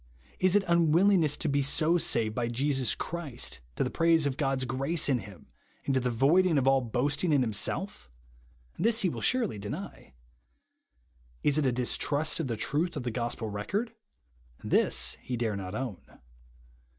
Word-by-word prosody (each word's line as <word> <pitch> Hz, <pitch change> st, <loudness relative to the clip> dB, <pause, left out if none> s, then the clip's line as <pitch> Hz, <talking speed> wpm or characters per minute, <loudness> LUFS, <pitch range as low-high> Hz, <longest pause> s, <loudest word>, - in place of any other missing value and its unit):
Is 185 Hz, +1 st, +3 dB
it 205 Hz, -2 st, +2 dB
un 170 Hz, -2 st, +3 dB
willingness 170 Hz, -3 st, +3 dB
to -, -, -3 dB
be 140 Hz, -1 st, +1 dB
so 155 Hz, +5 st, +2 dB
saved 115 Hz, -10 st, +1 dB
by 120 Hz, 0 st, -2 dB
Jesus 130 Hz, 0 st, 0 dB
Christ, 160 Hz, -, -4 dB, 0.2 s
to -, -, 0 dB
the -, -, -3 dB
praise 165 Hz, -2 st, +3 dB
of 140 Hz, -2 st, -1 dB
God's 135 Hz, -2 st, -1 dB
grace 135 Hz, +6 st, +1 dB
in 135 Hz, -3 st, +2 dB
him, 100 Hz, -4 st, -12 dB, 0.4 s
and 135 Hz, -, 0 dB
to 130 Hz, -, +2 dB
the 125 Hz, 0 st, -1 dB
voiding 155 Hz, +8 st, +3 dB
of 135 Hz, -, +1 dB
all 135 Hz, 0 st, +4 dB
boasting 140 Hz, +8 st, -1 dB
in 140 Hz, -3 st, +3 dB
himself? 120 Hz, -, -2 dB, 0.7 s
This 230 Hz, +1 st, +3 dB
he 190 Hz, -, +2 dB
will -, -, -6 dB
surely 235 Hz, -, 0 dB
deny. 105 Hz, -, -8 dB, 1.3 s
Is 145 Hz, +1 st, +3 dB
it 145 Hz, -, +1 dB
a -, -, +2 dB
distrust 145 Hz, +6 st, -1 dB
of 160 Hz, -, -2 dB
the 115 Hz, -3 st, -3 dB
truth 165 Hz, +10 st, -1 dB
of 135 Hz, -, -4 dB
the 120 Hz, -, -3 dB
gospel 115 Hz, -2 st, -3 dB
record? 200 Hz, -, -3 dB, 0.7 s
This -, -, +1 dB
he 125 Hz, -, -4 dB
dare 115 Hz, -3 st, -1 dB
not 95 Hz, 0 st, -6 dB
own. 120 Hz, -7 st, -4 dB
140 Hz, 175 wpm, -29 LUFS, 120-165 Hz, 1.3 s, all